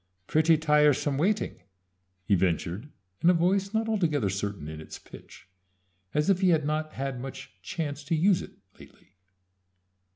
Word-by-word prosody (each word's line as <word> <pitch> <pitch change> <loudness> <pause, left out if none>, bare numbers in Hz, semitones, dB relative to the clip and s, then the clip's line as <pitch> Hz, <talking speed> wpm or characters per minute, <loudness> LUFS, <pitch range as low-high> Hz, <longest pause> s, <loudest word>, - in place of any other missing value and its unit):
"Pretty 160 +5 +4
tiresome 150 -2 +3
waiting," 200 - 0 0.6
he 100 - +1
ventured, 90 - 0 0.3
in 170 - +5
a 180 - +5
voice 190 +3 +1
not 225 0 0
altogether 155 - +1
certain 100 -5 -4
in 80 0 -7
its 80 - -9
pitch, - - -14 0.7
as 150 0 +2
if 195 -1 +3
he 185 - +4
had 160 -4 +3
not 155 +1 -2
had 135 -1 -4
much 135 0 -8
chance 145 -3 -4
to 165 +3 0
use 180 +3 +3
it - - -10 0.3
latterly. 95 - -18
150 Hz, 155 wpm, -28 LUFS, 130-170 Hz, 0.7 s, in